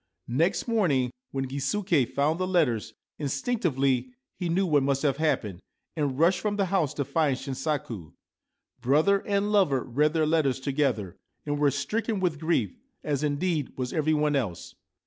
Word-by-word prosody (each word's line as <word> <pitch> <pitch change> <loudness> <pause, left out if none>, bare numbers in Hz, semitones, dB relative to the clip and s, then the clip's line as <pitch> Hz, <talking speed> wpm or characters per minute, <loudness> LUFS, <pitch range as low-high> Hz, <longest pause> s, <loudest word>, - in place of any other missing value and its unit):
Next 165 - +1
morning, 155 - +2 0.2
when 135 0 -3
Gisuke 140 - 0
found 150 +4 0
the 185 - 0
letters, 120 - +1 0.2
instinc 150 - -1
tively 135 - 0 0.2
he 175 - -3
knew 190 +4 +2
what 150 -5 +3
must 135 +1 0
have 140 -3 +2
happened, 110 - 0 0.4
and 145 -5 -1
rushed 170 +5 +4
from 210 -1 -1
the 200 -1 +1
house 165 -8 +1
to 140 - -1
find 140 -1 +1
Shinsaku. 135 - -4 0.7
Brother 155 +10 +3
and 205 0 +1
lover 150 - +3
read 150 +5 +1
their 160 -2 +2
letters 150 -5 +1
together, 130 - -1 0.3
and 145 -1 -1
were 145 -1 +4
stricken 210 - -2
with 175 -5 0
grief, 170 - 0 0.2
as, 145 -2 -1
indeed, 150 0 -1
was 125 -1 -3
every 155 0 +2
one 150 -1 +1
else. 105 -11 -3
145 Hz, 165 wpm, -27 LUFS, 135-170 Hz, 0.7 s, rushed